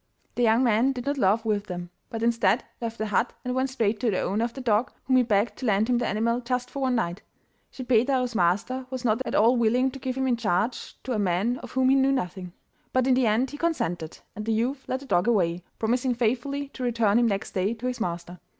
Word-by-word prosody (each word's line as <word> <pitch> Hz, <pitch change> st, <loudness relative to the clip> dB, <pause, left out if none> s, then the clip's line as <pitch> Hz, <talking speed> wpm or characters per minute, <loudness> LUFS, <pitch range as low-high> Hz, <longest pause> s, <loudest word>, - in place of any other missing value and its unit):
The -, -, -2 dB
young 230 Hz, +1 st, +4 dB
man 240 Hz, +3 st, +3 dB
did 245 Hz, -2 st, -6 dB
not 285 Hz, 0 st, -1 dB
laugh 215 Hz, +2 st, +2 dB
with 210 Hz, -1 st, 0 dB
them, 175 Hz, -1 st, -6 dB, 0.2 s
but 225 Hz, 0 st, -4 dB
instead 230 Hz, -1 st, +2 dB, 0.2 s
left 230 Hz, -1 st, -4 dB
the 220 Hz, -, -2 dB
hut 220 Hz, +3 st, 0 dB
and 250 Hz, -, -1 dB
went 260 Hz, +1 st, 0 dB
straight 225 Hz, -5 st, 0 dB
to 235 Hz, -, +1 dB
the 190 Hz, -, 0 dB
owner 210 Hz, +4 st, 0 dB
of 235 Hz, 0 st, -2 dB
the -, -, -8 dB
dog, 235 Hz, -1 st, +1 dB
whom 260 Hz, -1 st, +3 dB
he -, -, +6 dB
begged 220 Hz, -1 st, +1 dB
to 255 Hz, -, -3 dB
lend 210 Hz, +1 st, +2 dB
him 240 Hz, -, +3 dB
the 245 Hz, -, -1 dB
animal 230 Hz, +3 st, 0 dB
just 250 Hz, 0 st, -2 dB
for 280 Hz, -, -5 dB
one 260 Hz, -2 st, +1 dB
night. 180 Hz, -5 st, -2 dB, 0.5 s
Schippeitaro's 250 Hz, 0 st, +1 dB
master 215 Hz, +8 st, 0 dB
was 260 Hz, -1 st, -5 dB
not 225 Hz, +2 st, +2 dB
at -, -, -2 dB
all 230 Hz, +4 st, +5 dB
willing 245 Hz, +3 st, +2 dB
to 270 Hz, -, -9 dB
give 260 Hz, 0 st, -3 dB
him 265 Hz, -, 0 dB
in 250 Hz, -2 st, +1 dB
charge 225 Hz, +2 st, -1 dB
to 260 Hz, -, -5 dB
a 215 Hz, -, 0 dB
man 200 Hz, +6 st, 0 dB
of -, -, -10 dB
whom 260 Hz, 0 st, +3 dB
he 270 Hz, -, +5 dB
knew 270 Hz, 0 st, +3 dB
nothing, 185 Hz, -8 st, -3 dB, 0.4 s
but 255 Hz, -1 st, +2 dB
in 260 Hz, -, +4 dB
the 250 Hz, -2 st, +3 dB
end 230 Hz, +5 st, +1 dB
he 290 Hz, -, -7 dB
consented, 175 Hz, -, -2 dB, 0.2 s
and 210 Hz, -, -5 dB
the 225 Hz, -, +2 dB
youth 255 Hz, +5 st, -1 dB
led 260 Hz, +1 st, -2 dB
the -, -, -10 dB
dog 180 Hz, -5 st, +1 dB
away, 180 Hz, -6 st, +1 dB
promising 245 Hz, +3 st, 0 dB
faithfully 260 Hz, +5 st, -1 dB
to 260 Hz, -, -10 dB
return 230 Hz, -3 st, +2 dB
him 240 Hz, -, +3 dB
next 200 Hz, -2 st, -2 dB
day 195 Hz, +4 st, 0 dB
to 235 Hz, +2 st, -8 dB
his 250 Hz, -1 st, -2 dB
master. 175 Hz, -1 st, -4 dB
235 Hz, 250 wpm, -26 LUFS, 210-255 Hz, 0.5 s, he